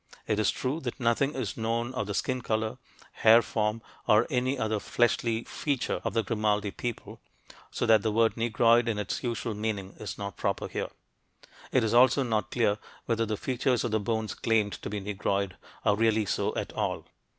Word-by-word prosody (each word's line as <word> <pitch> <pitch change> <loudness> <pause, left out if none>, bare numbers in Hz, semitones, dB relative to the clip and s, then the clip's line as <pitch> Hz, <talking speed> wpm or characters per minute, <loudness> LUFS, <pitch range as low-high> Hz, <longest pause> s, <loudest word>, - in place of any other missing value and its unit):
It 105 -1 0
is 110 - +3
true 135 +5 -1
that 130 -2 -5
nothing 130 +4 +1
is 125 -7 -3
known 115 +2 -1
of 105 -6 -2
the 100 - -3
skin 130 +2 -1
color, 110 -1 -1 0.3
hair 115 +1 +6
form, 110 +1 -1 0.2
or 110 +3 +5
any 130 +2 +1
other 110 -3 0
fleshy 115 0 +1
feature 140 -4 -2
of - - -3
the 115 - +2
Grimaldi 105 -1 0
people, 120 +2 -6 0.5
so - - -2
that 110 -2 +5
the 110 - 0
word 115 +1 +3
"Negroid" 115 +1 +3
in 115 -3 0
its 105 -2 -3
usual 120 -2 -2
meaning 105 -2 -3
is 105 - -6
not 100 -1 -6
proper - - -1
here. - - -3 0.8
It 130 - +3
is 110 - 0
also 130 +3 +5
not 110 -4 -1
clear 105 -4 +1 0.3
whether 115 -1 0
the 105 0 -2
features 125 0 0
of 120 - -1
the 110 - +2
bones 110 +1 -2
claimed 110 -3 +1
to - - -5
be 105 +1 -3
"Negroid" 100 -1 -2 0.3
are 105 - +4
really 110 0 +2
so - - -1
at - - -3
all. - - -2
110 Hz, 190 wpm, -28 LUFS, 105-120 Hz, 0.8 s, hair